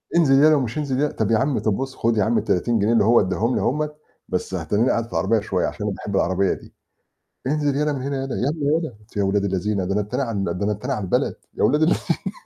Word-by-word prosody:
"انزل 145 -6 +5
يلا 155 0 +6
ومش 125 -2 -1
انزل 140 -3 -1
يلا، 150 0 +1
طب 110 0 -1
يا 110 - +4
عم، 135 +2 +1
طب 110 - 0
بُص 135 0 -4
خد 115 -1 0
يا 105 - +3
عم 115 +1 +1
ال30 115 +5 +1
جنيه 110 +4 +2
اللي 115 - +4
هو 115 +3 +5
اداهم 110 +5 0
لي - - 0
أهم، 150 +3 0 0.4
بس - - -3
هتنيني 115 +5 +1
قاعد 115 0 +1
في 115 - -18
العربية 115 -1 +1
شوية 95 -3 -1
عشان 105 - -5
أنا 100 -2 -2
باحب 100 -2 -5
العربية 95 +1 +2
دي." - - -12 0.7
"انزل 145 -1 0
يلا 150 0 +1
من 130 -2 -4
هنا 140 0 -2
يلا، 135 - -4
يالّا 145 +3 -1
يلا." 160 -5 -4
قلت 105 +1 -21
يا 100 - +1
أولاد 100 +1 +1
الذينة 95 0 -1
ده 95 - -2
أنا 105 - +1
التاني 125 +7 -2
على 105 -6 -2
ده 95 +3 -2
أنا 105 - +1
التاني 105 - -3
على 105 - -3
البلد 90 - 0 0.2
يا - - -3
أولاد 150 +3 +3
اللذينة. 160 - 0
115 Hz, 260 wpm, -22 LUFS, 105-140 Hz, 0.7 s, يلا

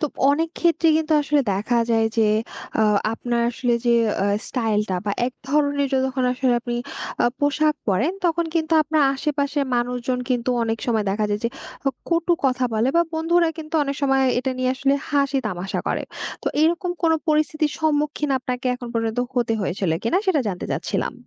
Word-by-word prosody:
তো 305 - +1 0.3
অনেক 320 +3 +1
ক্ষেত্রেই 335 -2 +3
কিন্তু 315 0 -1
আসলে 295 0 +2
দেখা 215 +5 0
যায় 225 -1 +3
যে 225 - +4 0.6
আ - - +5 0.3
আপনার 240 +1 -1
আসলে 245 0 -1
যে - - +4 0.3
এ - - +2 0.2
স্টাইলটা 215 -5 0
বা 200 - -1
এক 255 - -4 0.2
ধরনের 285 -1 +2
যতক্ষণ 260 -1 0
আসলে 255 0 +1
আপনি 240 0 -4 0.5
আ - - +3
পোশাক 300 +1 +2
পরেন 205 - +2
তখন 340 0 +1
কিন্তু 325 0 0
আপনার 310 0 +1
আশেপাশের 285 0 -1
মানুষজন 245 +1 -1
কিন্তু 245 0 +1
অনেক 225 0 -1
সময় 220 -3 +1
দেখা 210 +2 0
যায় 205 - -1
যে, 235 - +3 0.4
হক 270 -3 0
কটু 335 +1 +2
কথা 255 -1 +2
বলে 225 +4 +2
বা 340 - +6
বন্ধুরা 335 +1 +2
কিন্তু 310 0 -8
অনেক 280 -1 -2
সময় 270 -1 +3 0.2
এটা 265 +1 -1
নিয়ে 255 0 +1
আসলে 275 +1 +1
হাসি-তামাশা 260 - -1
করে। - - -1 0.4
তো - - -11 0.2
এরকম 340 +2 +1
কোনো 325 -1 +4
পরিস্থিতির 305 0 +1
সম্মুখীন 300 -1 0
আপনাকে 255 0 -4
এখন 245 -1 -7
পর্যন্ত 225 0 -1 0.2
হতে 240 -2 +1
হয়েছিল 190 -1 -1
কিনা 350 +11 +2
সেটা 350 -6 +3
জানতে 180 -2 -4
চাচ্ছিলাম? - - -2
270 Hz, 175 wpm, -22 LUFS, 235-305 Hz, 0.6 s, বা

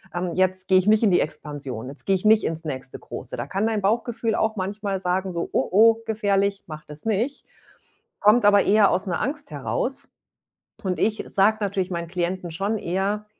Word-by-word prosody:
ähm, 175 0 -2
„jetzt 185 +1 +1
gehe 185 -1 +5
ich 185 - -3
nicht 215 +1 +4
in 205 - +4
die 175 - +4
Expansion, 140 -6 -5
jetzt 140 - -11
gehe 195 - +4
ich 185 - -4
nicht 215 0 +5
ins 165 0 -3
nächste 130 -3 -5
Große.“ - - -8
Da - - -3
kann 200 +3 -1
dein 220 -2 -1
Bauchgefühl 225 +2 0
auch 220 0 0
manchmal 200 0 -3
sagen 185 +1 -1
so: 170 -1 -3
„Oh, - - +1
oh, 225 +4 +6
gefährlich, 200 -2 0
mach 155 -2 -9
das 150 0 -11
nicht.“ 225 +6 -1 0.7
Kommt 210 +2 +5
aber 205 -1 +6
eher 205 -1 +5
aus 185 - 0
'ner 180 - -1
Angst 285 +2 -4
heraus. - - -3 0.7
Und 185 -2 -2
ich 215 0 0
sage 210 +3 +4
natürlich 195 -2 -1
meinen 170 -1 -3
Klienten 180 0 -2
schon 200 +6 -1
eher 200 +3 -2
195 Hz, 195 wpm, -24 LUFS, 180-215 Hz, 0.7 s, oh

